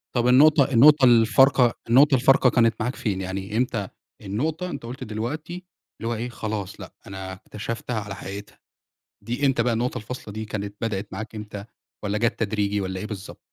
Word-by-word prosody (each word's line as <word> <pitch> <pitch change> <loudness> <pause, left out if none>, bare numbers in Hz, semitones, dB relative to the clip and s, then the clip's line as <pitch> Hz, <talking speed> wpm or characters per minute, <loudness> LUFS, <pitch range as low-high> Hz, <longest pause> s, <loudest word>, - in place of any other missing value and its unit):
طَب 120 0 +2
النقطة، 140 +2 +5
النقطة 135 +3 +7
الفارقة، 120 +1 +5 0.2
النقطة 135 +3 +6
الفارقة 135 0 +4
كانت 115 -2 +3
معاك 125 +4 -2
فين؟ 95 -4 -2
يعني 95 +3 -4
إمتى 115 -6 -1 0.3
النقطة 155 - -3
أنت - - -6
قُلت 125 +3 -7
دلوقتي 150 +12 -5 0.4
اللي 115 - -3
هو 120 - -1
إيه 120 +3 -4
"خلاص 110 -4 -5
لأ، - - -10
أنا 95 -1 -7
اكتشفتها 110 +4 -5
على 100 -1 -6
حقيقتها"، 100 +2 -9 0.7
دي 125 +5 -1
إمتى 130 -3 +2
بقى 120 0 +1
النقطة 125 +3 -1
الفاصلة 110 -2 -8
دي، 110 0 -4
كانت 100 -1 -5
بدأت 105 -3 -3
معاك 110 0 -6
إمتى؟ 105 -1 -7 0.4
والّا 105 +1 -1
جت 115 +2 0
تدريجي 105 -2 0
والّا 95 -1 -4
إيه 105 - -4
بالضبط؟ 105 -2 -8
115 Hz, 175 wpm, -24 LUFS, 105-125 Hz, 0.7 s, النقطة